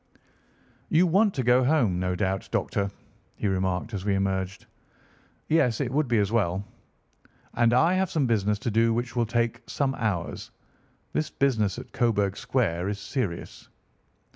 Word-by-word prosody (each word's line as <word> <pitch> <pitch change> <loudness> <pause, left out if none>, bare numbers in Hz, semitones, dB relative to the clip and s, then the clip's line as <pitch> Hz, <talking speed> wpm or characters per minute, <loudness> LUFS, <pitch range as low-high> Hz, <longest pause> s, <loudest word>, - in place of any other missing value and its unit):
"You 170 +3 +4
want 195 +4 +3
to 130 - -1
go 125 +2 +4
home, 125 - +2
no 90 0 -1
doubt, 95 0 -2
Doctor," 100 -1 -1 0.5
he - - -2
remarked 95 +3 -1
as 95 -2 -3
we 100 -1 +1
emerged. 95 -1 -2 0.8
"Yes, 125 -8 +2
it 130 -4 -1
would 145 +1 +1
be 120 -1 +2
as 100 -1 +1
well." 100 -4 0 0.9
"And 115 0 +3
I 160 +9 +4
have 190 -1 +1
some 150 -4 +1
business 105 -3 +1
to 115 - +1
do 115 +1 +3
which 120 +1 -3
will 120 -2 +1
take 115 0 0
some 135 -2 0
hours. 105 -9 -3 0.6
This 155 - -1
business 110 -8 +1
at - - -9
Coburg 100 -5 +1
Square 100 -8 -1
is 100 - -3
serious." 100 -5 -4
115 Hz, 160 wpm, -26 LUFS, 95-130 Hz, 0.9 s, You